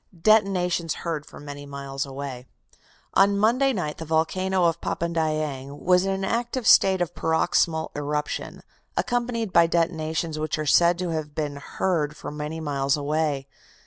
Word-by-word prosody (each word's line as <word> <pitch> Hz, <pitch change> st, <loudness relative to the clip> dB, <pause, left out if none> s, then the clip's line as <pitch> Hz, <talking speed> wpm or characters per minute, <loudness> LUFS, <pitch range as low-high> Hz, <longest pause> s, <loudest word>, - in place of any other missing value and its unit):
DETONATIONS 180 Hz, -5 st, +2 dB
HEARD 155 Hz, -3 st, -3 dB
FOR -, -, -12 dB
MANY 145 Hz, -1 st, -8 dB
MILES 140 Hz, 0 st, -5 dB
AWAY 135 Hz, -2 st, -7 dB, 0.7 s
"On 200 Hz, +1 st, +4 dB
Monday 245 Hz, +6 st, +3 dB
night 175 Hz, -10 st, -3 dB
the -, -, -4 dB
volcano 180 Hz, +4 st, +1 dB
of 170 Hz, 0 st, +1 dB
Papandayang 155 Hz, -4 st, -2 dB
was 180 Hz, +1 st, +3 dB
in -, -, +1 dB
an 195 Hz, 0 st, -2 dB
active 240 Hz, +3 st, -2 dB
state 190 Hz, -3 st, +6 dB
of 170 Hz, -, -7 dB
paroxysmal 160 Hz, 0 st, +1 dB
eruption, 145 Hz, 0 st, -3 dB, 0.3 s
accompanied 235 Hz, -4 st, -1 dB
by 170 Hz, 0 st, +6 dB
detonations 160 Hz, -1 st, -1 dB
which 155 Hz, 0 st, -1 dB
are 155 Hz, -, -2 dB
said 170 Hz, +4 st, +4 dB
to 180 Hz, -1 st, -2 dB
have 155 Hz, -2 st, -4 dB
been 145 Hz, -2 st, -3 dB
heard 150 Hz, 0 st, -1 dB
for -, -, -7 dB
many 150 Hz, +2 st, -5 dB
miles 140 Hz, -2 st, 0 dB
away. 145 Hz, -1 st, -1 dB
160 Hz, 150 wpm, -25 LUFS, 150-185 Hz, 0.7 s, state